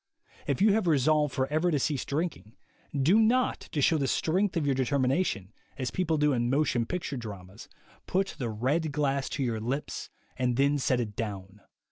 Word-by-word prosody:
If 140 +6 +1
you 210 -1 +6
have 215 -4 +1
resolved 150 -1 +3
forever 150 +7 0
to 155 - +2
cease 140 0 -1
drinking, 140 - -3 0.4
do 170 +11 +4
not, 245 +3 +3
to 145 - 0
show 160 +1 +4
the 135 - 0
strength 185 +6 +1
of 155 - 0
your 140 - +2
de 130 0 +1
termination, 130 - 0 0.2
as 130 -2 -2
people 170 -4 0
do 150 -1 +3
in 120 -1 0
motion 130 -4 +1
picture 175 -6 -3
dramas, 100 -4 -9 0.4
put 195 +1 0
the 120 -3 -2
red 140 +9 0
glass 140 -2 0
to 140 - -2
your 115 -3 -1
lips 130 +7 -4 0.3
and 125 -1 0
then 140 +1 +3
set 130 -1 +1
it 105 -4 -3
down. 100 -2 -5
140 Hz, 185 wpm, -28 LUFS, 120-160 Hz, 0.4 s, you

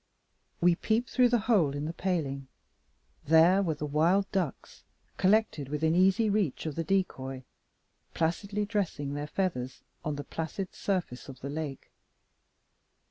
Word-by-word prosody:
We 175 0 +5
peeped 225 +7 -1
through 250 -1 +4
the 240 -2 +2
hole 175 - +3
in 145 +1 -3
the 160 - -3
paling. 145 -8 -2 0.8
There 165 +6 +6
were 165 -5 0
the 150 - -4
wild 170 +7 +2
ducks 180 -8 -3 0.3
collected 190 -8 +2
within 155 +2 +1
easy 190 +5 +4
reach 200 -9 0
of 155 - -2
the 165 - -2
decoy 135 -8 -1 0.7
placidly 200 +6 -1
dressing 185 -9 -2
their 145 +1 -4
feathers 135 -8 -3 0.2
on 150 -1 -2
the 145 - -5
placid 165 +6 -5
surface 175 -11 -3
of 130 -1 -11
the 140 - -5
lake. 150 -3 -5
165 Hz, 140 wpm, -29 LUFS, 145-195 Hz, 0.8 s, There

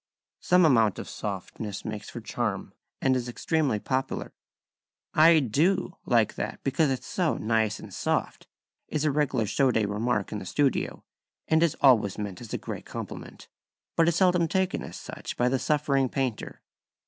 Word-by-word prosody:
Some 180 -1 +4
amount 115 -9 +4
of - - -6
softness 105 -2 -5
makes 105 -2 -5
for - - -7
charm, - - -3 0.3
and 130 -1 +4
is 125 -1 -2
extremely 145 -1 0
popular: 130 +5 -3 0.8
"#I 160 +1 +7
do# 155 - +1
like 115 -3 +3
that - - -4
because 140 +2 +2
it's 130 -2 -2
so 175 -4 0
nice 110 -1 +1
and - - -11
soft" - - -2 0.4
is 155 0 -1
a 150 - +3
regular 135 -5 +1
show 130 +6 +2
day 110 -3 +2
remark 105 0 -1
in 105 - -3
the 95 - -8
studio, 145 -2 0 0.4
and 160 0 +3
is 170 -3 +2
always 110 -8 +4
meant 100 -4 -5
as 115 - -9
a - - -1
great - - -7
compliment, - - -8 0.5
but 165 -1 +4
is 170 - +3
seldom 180 -2 +3
taken 190 +2 0
as - - -8
such - - -7
by 120 - +2
the 130 +1 +1
suffering 140 -3 +1
painter. 130 -5 -3
130 Hz, 170 wpm, -27 LUFS, 110-155 Hz, 0.8 s, I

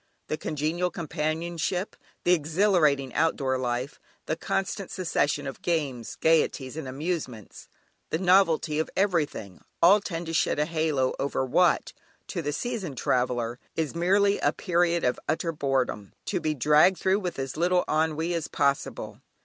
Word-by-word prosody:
The 155 - -1
congenial 160 +4 -1
companionship, 170 +3 -2 0.3
the 180 - +4
exhilarating 155 -5 +2
outdoor 135 -5 +1
life, 125 +2 -3 0.3
the 155 - -1
constant 195 +2 -2
succession 145 -5 0
of 135 - -6
games, 140 -9 -2
gaieties, 150 -4 +1
and 160 -4 -5
amusements, 135 - -5 0.4
the - - 0
novelty 170 -4 +3
of 160 - -1
every 180 -6 +2
thing, 100 -9 -10 0.2
all 190 +5 +7
tend 170 -4 -4
to 165 - -5
shed 160 - +1
a 150 - +2
halo 155 -5 0
over 135 -1 -1
what, 180 +7 +2 0.4
to 175 - -3
the 145 -2 -2
seasoned 190 - -4
traveller, 125 -1 0 0.2
is 160 -3 -1
merely 200 +4 +3
a - - +2
period 170 -2 +1
of 125 - +1
utter 165 +2 0
boredom, 135 -9 -1
to - - -1
be 155 -1 -1
dragged 150 +7 +5
through 190 +2 +2
with 180 -4 -4
as 135 -1 -4
little 180 +2 +2
ennui 160 +2 0
as 165 -3 -2
possible. 140 0 -1
160 Hz, 150 wpm, -27 LUFS, 140-175 Hz, 0.4 s, all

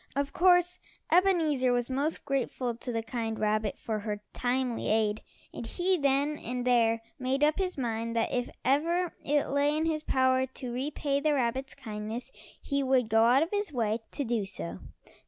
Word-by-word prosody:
Of 280 0 -1
course 355 0 +4 0.3
Ebenezer 325 -8 +3
was 245 -1 +1
most 280 +4 -2
grateful 260 -3 -1
to 235 +2 -6
the 225 -1 -2
kind 225 -1 -3
rabbit 215 -1 0
for 220 -2 -3
her 210 0 -4
timely 245 -1 -1
aid, 215 -1 +1 0.3
and - - -6
he 370 +6 +1
then 285 -1 +1
and 245 +1 -4
there 230 -2 +3 0.2
made 260 +2 0
up 305 +4 +3
his 370 -3 -1
mind 230 -2 -2
that 230 - 0
if 245 -1 -1 0.2
ever 335 +6 +2
it 290 0 +1
lay 285 +2 +2
in 315 - 0
his 315 -1 0
power 260 -2 +2
to 255 -1 -7
repay 280 +2 -1
the 300 0 +2
rabbit's 260 +1 -1
kindness 225 0 -6 0.3
he 280 -1 -1
would 260 -4 +2
go 225 +1 +5
out 255 +5 +5
of 330 - -5
his 410 -4 -1
way 225 -4 0
to 285 - -1
do 230 -4 0
so. 90 - -5
260 Hz, 180 wpm, -29 LUFS, 230-295 Hz, 0.3 s, go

